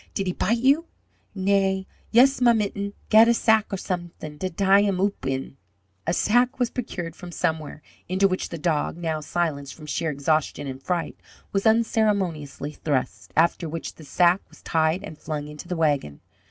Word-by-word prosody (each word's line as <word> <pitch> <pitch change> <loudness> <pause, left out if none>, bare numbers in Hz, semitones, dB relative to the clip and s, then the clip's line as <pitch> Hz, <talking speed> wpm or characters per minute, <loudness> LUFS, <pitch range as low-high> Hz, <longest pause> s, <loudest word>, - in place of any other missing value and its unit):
"Did 195 - -1
he 180 - -1
bite 225 +7 +1
you?" 280 +7 +3 0.5
"Na, 190 0 +2 0.3
yust 255 +3 +5
ma 240 -1 +6
mitten. 200 -2 -2 0.2
Gat 220 +1 +8
a 235 - +4
sack 220 -2 +3
or 195 - -1
someding 175 -5 -5
da 185 +4 -2
die 195 +3 +4
him 200 -3 +1
oop 195 -7 -1
in." 135 0 -3 0.5
A 170 - +2
sack 245 +4 +2
was 245 -2 0
procured 175 -9 -5
from 175 -1 -9
somewhere, 160 -3 -2 0.3
into 190 +2 +3
which 185 -1 -2
the 170 - -5
dog, 155 0 -1
now 160 -2 -2
silenced 150 -3 -2
from 155 - -12
sheer 160 +2 -1
exhaustion 145 0 0
and 135 -1 -6
fright, 175 +2 -2 0.3
was 195 +2 +1
unceremoniously 200 -11 +1
thrust, 130 -10 -3
after 165 0 +2
which 165 +1 -5
the 160 - -14
sack 175 +5 +3
was - - -19
tied 160 +2 +1
and 155 - -9
flung 150 -1 -4
into 150 +3 -9
the 180 - -3
wagon. 145 - 0
175 Hz, 180 wpm, -24 LUFS, 155-200 Hz, 0.5 s, Gat